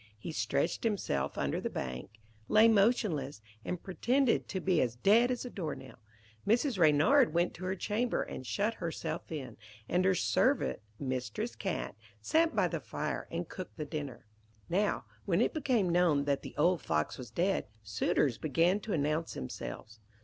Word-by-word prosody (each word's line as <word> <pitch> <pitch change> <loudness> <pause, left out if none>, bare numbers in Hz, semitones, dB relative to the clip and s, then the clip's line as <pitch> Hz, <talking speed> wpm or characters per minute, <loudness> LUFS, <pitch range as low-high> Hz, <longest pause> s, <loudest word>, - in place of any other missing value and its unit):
He 110 - -6
stretched - - 0
himself 205 - -1
under - - -1
the - - -2
bank, 65 -1 -5 0.4
lay 215 +1 +6
motionless, 200 - +2 0.2
and 180 - -4
pretended 245 +6 +1
to 190 - -3
be 185 -3 +2
as 120 -2 0
dead 215 - +4
as 250 0 -2
a - - -4
door 160 -7 -3
nail. 130 - -12 0.5
Mrs. 235 0 +2
Reynard 155 0 +5
went 175 +1 +2
to 185 - -7
her 185 +1 -1
chamber, 220 +5 0
and - - -7
shut 205 - 0
herself 170 -5 -5
in; 145 -5 -6 0.3
and 180 +1 +2
her 190 0 +3
servant, 105 - +2 0.2
Mistress 135 - -3
Cat, - - -3 0.2
sat 325 +1 +2
by - - +3
the - - -3
fire, - - -4
and 170 0 -3
cooked 185 - -8
the 155 - -3
dinner. 145 -6 -6 0.4
Now, 200 +4 +1 0.2
when - - +2
it - - +2
became 255 - +1
known 170 -5 +3
that 140 -1 +1
the - - -9
old 175 +3 +3
Fox 75 - -1
was 125 -3 -7
dead, 175 - 0 0.2
suitors 105 +5 +1
began 165 +6 +2
to 210 0 -4
announce 155 +2 0
themselves. 65 - -7
175 Hz, 170 wpm, -32 LUFS, 140-210 Hz, 0.5 s, lay